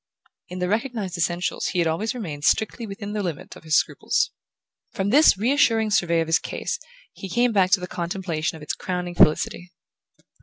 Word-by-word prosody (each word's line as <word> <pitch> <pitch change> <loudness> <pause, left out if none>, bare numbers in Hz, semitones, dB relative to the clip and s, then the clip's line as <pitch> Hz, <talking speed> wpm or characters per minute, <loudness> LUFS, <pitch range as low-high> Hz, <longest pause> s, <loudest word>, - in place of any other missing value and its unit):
In 180 - -7
the 180 0 -1
recognized 215 -3 -2
essentials 175 +1 -1
he - - -3
had 170 -2 +2
always 210 +10 -1
remained 155 -11 -6
strictly 220 +6 +1
within 205 +1 -6
the 210 - -1
limit 170 -6 -5
of - - -14
his 155 -1 +1
scruples. - - 0 0.6
From 200 -2 -1
this 290 -5 +6
reassuring 225 -2 +2
survey 170 -5 +2
of 165 - -2
his 165 - +3
case - - -4 0.3
he 195 - -8
came 240 +4 +2
back 190 -3 +3
to 195 +1 +4
the 180 - -5
contemplation 170 -3 -3
of 155 - -10
its 150 - -3
crowning 180 -1 -4
felicity. 175 +2 +2
185 Hz, 185 wpm, -23 LUFS, 170-215 Hz, 0.6 s, this